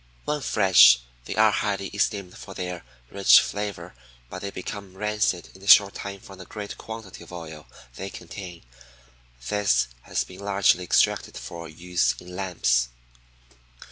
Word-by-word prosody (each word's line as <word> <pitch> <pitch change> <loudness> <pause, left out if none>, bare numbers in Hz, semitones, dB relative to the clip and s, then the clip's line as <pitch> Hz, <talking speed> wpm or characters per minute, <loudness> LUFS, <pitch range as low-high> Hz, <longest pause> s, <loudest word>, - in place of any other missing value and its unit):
When 150 0 -1
fresh, 95 - +6 0.3
they - - -5
are - - +5
highly 100 -1 -1
esteemed 100 -2 -2
for 95 - -10
their 90 -1 -5 0.3
rich 100 -1 +7
flavor; 105 0 -4 0.4
but - - -6
they 100 - -4
become 95 0 -8
rancid 105 -4 -1
in 95 - -15
a 100 - -12
short 100 0 +8
time 100 0 -7
from 95 -1 -13
the 95 - -9
great 105 +1 -7
quantity 110 -6 -9
of 85 - -15
oil 80 -3 -9 0.3
they 95 - -5
contain. 90 -1 -9 0.9
This 60 -13 +2
has - - -2
been 90 0 -13
largely 100 -2 +2
extracted - - +1
for 80 +7 -8
use 80 -6 0
in 90 0 -11
lamps. 80 -11 +1
95 Hz, 150 wpm, -25 LUFS, 85-100 Hz, 0.9 s, short